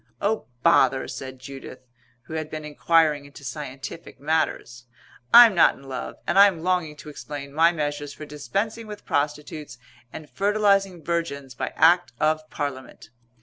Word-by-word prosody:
"Oh, 215 +2 -1 0.2
bother," 130 0 +4
said 130 0 -7
Judith, 135 0 -10 0.4
who - - -11
had 155 -1 -4
been 155 -1 -6
enquiring 150 -1 +2
into 140 0 -14
scientific 135 +2 -8
matters, 145 -5 -2 0.5
"I'm 235 -2 +9
not 170 - +5
in - - -17
love 130 -2 -6
and 195 - +2
I'm 195 -5 +6
longing 180 -4 0
to 150 - -11
explain 140 0 -8
my 165 +3 +5
measures 145 -3 -3
for 155 +2 -9
dispensing 200 +10 -4
with 210 -1 -9
prostitutes 150 -2 -3 0.3
and 155 - -9
fertilizing 200 -3 +1
virgins 140 -6 -3
by - - -4
Act 175 -2 +4
of 155 0 0
Parliament." 130 -6 -6
150 Hz, 145 wpm, -24 LUFS, 140-175 Hz, 0.5 s, I'm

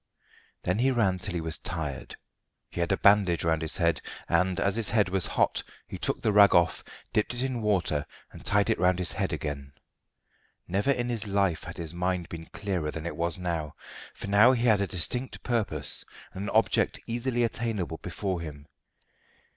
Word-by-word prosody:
Then 90 +4 0
he 130 +2 +3
ran 105 -8 +2
till 90 0 0
he 85 - -1
was 80 0 -2
tired. 80 -6 -4 0.6
He - - -6
had 85 +1 0
a 95 - +3
bandage 100 -4 +4
round 80 -1 +1
his 80 -1 -2
head, 85 -4 +1 0.3
and, 90 +2 +2
as 100 +1 +1
his 115 -2 0
head 105 -3 +2
was 95 -1 0
hot, - - +1 0.3
he - - -7
took - - 0
the 110 - +3
rag 100 -1 +7
off, 85 -1 +3 0.3
dipped 105 +3 +1
it 120 - -1
in 130 -3 -2
water, 90 -8 +1 0.2
and - - -12
tied 100 -1 +3
it - - 0
round 90 0 +3
his 90 -1 -1
head - - -1
again. 70 -2 -4 0.9
Never 100 +8 0
in 125 -3 +1
his 115 -3 -2
life 100 -4 +1
had - - -8
his 85 -1 -5
mind 90 0 -1
been 80 -1 -8
clearer 90 -7 -3
than 80 +1 -6
it 85 -3 -4
was 85 0 -1
now, 85 -4 -3 0.4
for - - -7
now 105 +5 +6
he 120 -2 0
had 110 -4 +4
a 100 - 0
distinct 120 +8 -2
purpose, 105 - -1 0.3
and 95 +2 -5
an - - -3
object - - +2
easily 120 +1 -1
attainable, 110 -8 -2
before 90 0 -3
him. 75 -3 -8
95 Hz, 195 wpm, -28 LUFS, 85-105 Hz, 0.9 s, rag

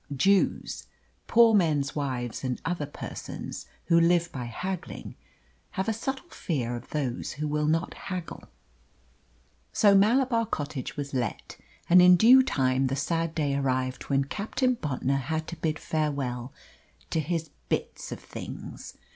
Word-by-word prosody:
Jews, 195 +7 +2 0.4
poor 230 -1 +6
men's 150 -8 +2
wives, 130 -5 -3
and 125 -1 -2
other 165 -3 -1
persons 145 - -7 0.2
who 170 - +5
live 170 0 +3
by 125 -3 -5
haggling, 180 - -5 0.6
have 190 - 0
a 225 - +2
subtle 265 +8 -4
fear 120 -8 -2
of 120 +1 -9
those 135 -5 -2
who 150 +2 -3
will 150 0 0
not 165 +2 +1
haggle. 180 -3 -6 1.3
So 205 -2 +5
Malabar 230 +3 +4
Cottage 145 - -4
was 140 -1 -4
let; 120 -5 -3 0.3
and 180 +1 +8
in 180 0 +8
due 245 +8 +8
time 135 - +1
the 130 - -1
sad 165 +3 -1
day 145 -3 0
arrived 130 -2 -1
when 140 -1 +3
Captain 225 - 0
Bontnor 140 - -1
had 160 +4 -2
to 170 - -5
bid 155 -1 -1
farewell 140 -6 -2 0.6
to 160 - +1
his 160 0 -2 0.2
"bits - - -3
of - - -5
things." - - -8
155 Hz, 145 wpm, -27 LUFS, 135-180 Hz, 1.3 s, and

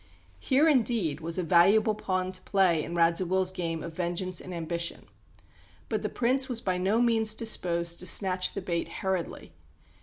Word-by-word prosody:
Here 280 +4 +2
indeed 230 - +1
was 165 +2 -2
a 185 - -1
valuable 195 +6 +4
pawn 185 -3 -2
to 185 0 -3
play 185 -6 +2
in 170 - -6
Radziwill's 180 +2 +2
game 165 -3 -4
of 165 - -7
vengeance 175 +1 -3
and 185 - -9
ambition. 170 0 -4 0.8
But - - -1
the - - -3
Prince 260 +2 0
was 240 -2 -2
by 185 -4 -2
no 195 +5 +1
means 225 -2 +3
disposed 170 -6 0
to 180 - -4
snatch 185 0 +2
the 200 - -5
bait 170 -2 -2
hurriedly. 190 -3 -4
185 Hz, 170 wpm, -28 LUFS, 170-215 Hz, 0.8 s, valuable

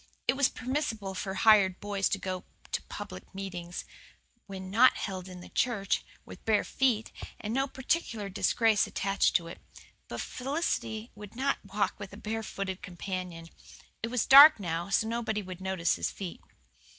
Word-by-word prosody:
It - - +4
was 280 -1 +3
permissible 240 -7 -3
for 190 +1 -4
hired 195 -3 +5
boys 200 -1 0
to 200 - 0
go 185 -1 -4 0.3
to - - -1
public 90 - -8
meetings 175 -3 -5 0.6
when 190 -1 -7
not 245 +5 +6
held 185 -2 -4
in 180 -1 -9
the - - -11
church 215 -6 0 0.2
with - - -12
bare 220 -2 +3
feet, 240 -5 0 0.3
and 215 +1 -4
no 270 +2 +1
particular 260 -5 -2
disgrace 215 +2 +2
attached 195 +1 +1
to 170 - +3
it. 165 - -9 0.5
But - - -6
Felicity 255 -5 -2
would 210 0 -11
not 275 +3 0
walk 200 0 -1
with 200 -1 -8
a - - -9
barefooted 205 -4 -4
companion. 180 -3 -6 0.5
It 225 - -1
was 245 -1 0
dark 285 0 +10
now, 170 -1 -3
so 220 +3 +2
nobody 225 -2 -2
would 185 -1 -8
notice 190 -3 0
his - - -1
feet. 185 -4 -7
200 Hz, 165 wpm, -30 LUFS, 190-230 Hz, 0.6 s, dark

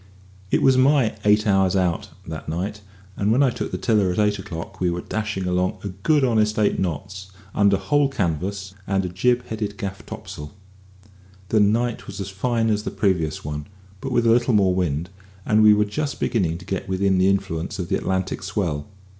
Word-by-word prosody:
It - - +2
was 130 -1 +5
my 130 -3 +4
"eight 105 0 +4
hours 95 -2 +3
out" 90 -3 0 0.2
that 80 -2 -6
night, 95 +6 -3 0.3
and 100 +1 +1
when 130 +5 +4
I 130 - +3
took - - -4
the - - -2
tiller 105 -5 +2
at 90 - -4
eight 105 -1 +2
o'clock 95 +1 -7
we 90 - +2
were 85 +1 -2
dashing 105 -3 -3
along 90 0 0
a 100 - -3
good 135 - +1
honest 110 -3 +2
eight 105 -1 +2
knots, 95 +2 -4 0.2
under 100 -1 +4
whole 145 +3 +2
canvas 95 - -2
and 95 -1 +1
a - - -2
jib 120 +7 +1
headed 105 -2 -4
gaff 95 -1 -5
topsail. 75 +4 -8 0.9
The 110 - +3
night 115 +4 +1
was 100 -1 -7
as 100 -1 -4
fine 115 +3 0
as 105 -1 +1
the - - -4
previous 85 -8 0
one, 75 0 -4 0.3
but 135 - -5
with 120 -2 +2
a 115 - +5
little 120 0 +3
more 95 -3 +4
wind, 85 -1 -1 0.3
and 110 0 +4
we 105 -1 +7
were 105 0 +2
just 140 +7 -3
beginning 85 -8 0
to 90 - -12
get 95 0 -4
within 95 0 +2
the 95 +1 +4
influence 95 -4 -1
of 90 -2 -4
the 95 - +2
Atlantic 95 -1 -2
swell. 80 -8 -2
100 Hz, 200 wpm, -23 LUFS, 90-110 Hz, 0.9 s, we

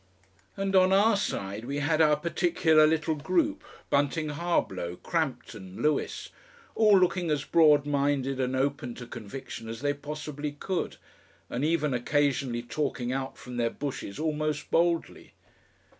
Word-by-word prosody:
And 195 0 -1
on 185 0 +5
our 205 +3 +5
side 105 - -3
we 140 +3 -3
had 155 +2 +1
our 150 -1 +5
particular 160 -1 +3
little 160 0 +1
group, 300 - 0 0.3
Bunting 145 +2 +1
Harblow, 145 - -1
Crampton, 120 - -4
Lewis, 150 0 -1 0.4
all 210 -3 +5
looking 180 -2 +1
as 150 -2 0
broad 150 -3 +5
minded 140 -2 0
and 130 0 0
open 130 -3 -1
to 120 - -8
conviction 115 0 -8
as 115 +1 -6
they 145 0 +1
possibly 150 0 -6
could, 180 +5 -3 0.5
and 125 - -2
even 155 -2 +1
occasionally 130 -2 0
talking 125 -2 -2
out 135 0 -4
from 125 -1 -8
their 115 -1 +1
bushes 130 -7 -5
almost 155 -1 -2
boldly. 170 0 0
145 Hz, 140 wpm, -28 LUFS, 130-165 Hz, 0.5 s, on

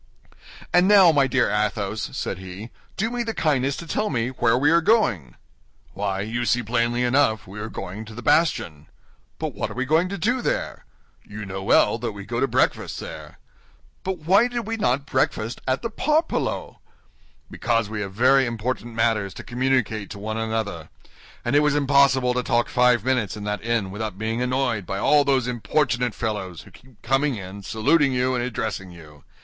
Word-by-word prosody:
"And 180 +1 +5
now, 195 -4 +7
my 140 -3 +3
dear 130 - +1
Athos," 105 0 -1
said 95 - -4
he, 95 +5 -9 0.3
"do 220 +4 -1
me 245 0 -2
the 230 -1 -3
kindness 140 -3 +1
to 170 - -7
tell 210 +6 -1
me 120 -3 -1
where 125 -2 +1
we 145 +4 +3
are 170 0 +5
going?" 125 - +1 0.6
"Why, 100 -1 -2
you 115 +4 -2
see 120 0 +1
plainly 120 +2 0
enough 125 -3 +2
we 100 +3 -9
are 110 +1 -5
going 100 +2 -7
to 110 0 -11
the 125 - -8
bastion." 85 - +1 0.5
"But - - -4
what - - -3
are - - -8
we 130 +1 -1
going 160 +6 +2
to 200 - -4
do 240 +8 0
there?" - - -3 0.4
"You 105 0 -8
know 95 0 -5
well 95 - +3
that 115 -3 -3
we 100 -1 -9
go - - -3
to - - +2
breakfast - - 0
there." - - -9 0.7
"But 190 -1 -2
why 190 +9 +4
did 245 -1 -3
we 225 +1 -2
not 140 - 0
breakfast 120 -4 -1
at 130 +1 0
the 230 - -3
Parpaillot?" 305 +8 -1 0.7
"Because 115 -3 0
we 105 0 -4
have 100 -1 -4
very 130 +5 +4
important 120 0 -4
matters 110 -4 0
to - - -8
communicate 125 -4 -1
to 100 - -8
one 110 +2 -4
another, 110 -7 -3 0.6
and 120 +4 +1
it - - +7
was 150 -1 +2
impossible 140 -3 +3
to 125 - 0
talk 120 -1 0
five 125 -3 +3
minutes 125 -6 0
in 105 - -7
that 105 +1 -3
inn 115 -5 -1
without 105 -1 -5
being 110 +3 -2
annoyed 125 -6 -1
by 95 - -3
all 145 +7 +4
those 135 -3 +2
importunate 125 -1 0
fellows, 100 -7 -4
who - - -17
keep 125 -4 -20
coming 135 +3 +1
in, 95 0 -8
saluting 135 +9 +2
you, 125 +1 +1
and 120 -1 -1
addressing 110 -5 -3
you. 75 -4 -14
120 Hz, 190 wpm, -23 LUFS, 105-140 Hz, 0.7 s, now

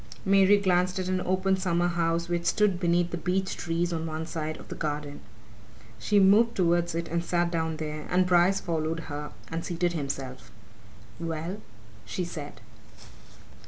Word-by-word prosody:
Mary 195 +1 +6
glanced 185 -1 +2
at 185 -1 -2
an 185 0 0
open 185 +1 +1
summer 175 -2 +1
house 170 0 0
which 175 0 -1
stood 205 -4 +2
beneath 175 -1 +2
the 175 - -2
beech 185 +3 -1
trees 170 +1 -1
on 165 0 -2
one 160 0 -4
side 155 -1 -4
of - - -13
the - - -6
garden. 145 -2 -4 0.8
She 205 - +3
moved 215 +4 +5
towards 170 -2 +2
it 170 0 -2
and 170 +1 -1
sat 175 0 0
down 160 -2 -1
there, 155 -1 -5
and 185 0 +3
Bryce 180 +2 +4
followed 165 -2 -2
her 150 0 -5 0.2
and 165 +1 -3
seated 175 0 -1
himself. 135 -4 -5 0.7
"Well 165 +4 -4 0.2
" 110 - -22 0.2
she 140 - -3
said. 150 -4 -8
170 Hz, 165 wpm, -28 LUFS, 160-185 Hz, 0.8 s, Mary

